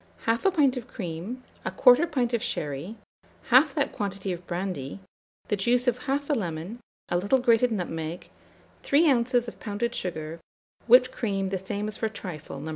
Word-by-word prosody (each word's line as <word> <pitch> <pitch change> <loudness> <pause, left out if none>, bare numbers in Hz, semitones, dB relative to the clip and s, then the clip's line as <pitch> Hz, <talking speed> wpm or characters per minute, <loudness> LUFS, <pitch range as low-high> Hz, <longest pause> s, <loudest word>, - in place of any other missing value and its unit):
1/2 230 +12 +2
pint 280 -5 +4
of 245 -1 -6
cream, 200 +3 -6 0.2
1/4 255 +6 +5
pint 250 -6 0
of 235 - +1
sherry, 155 - -4 0.5
half 270 +4 +6
that 285 -3 0
quantity 195 -2 -3
of 175 0 -9
brandy, 175 -4 -4 0.5
the 210 - +1
juice 240 +5 +1
of 245 0 +2
1/2 285 +2 0
lemon, 180 +1 -4 0.3
a 175 - +2
little 205 +8 +3
grated 245 -1 +3
nutmeg, 170 -4 -4 0.5
3 305 +4 +4
oz. 245 0 +1
of - - -9
pounded 225 +3 -2
sugar, 165 -5 -4 0.5
whipped 250 +2 +7
cream 195 -4 -2
the 195 - -1
same 200 +2 -3
as 215 - -4
for 220 - -1
trifle 170 -9 -7
No. 155 +3 -6
215 Hz, 165 wpm, -27 LUFS, 180-250 Hz, 0.5 s, whipped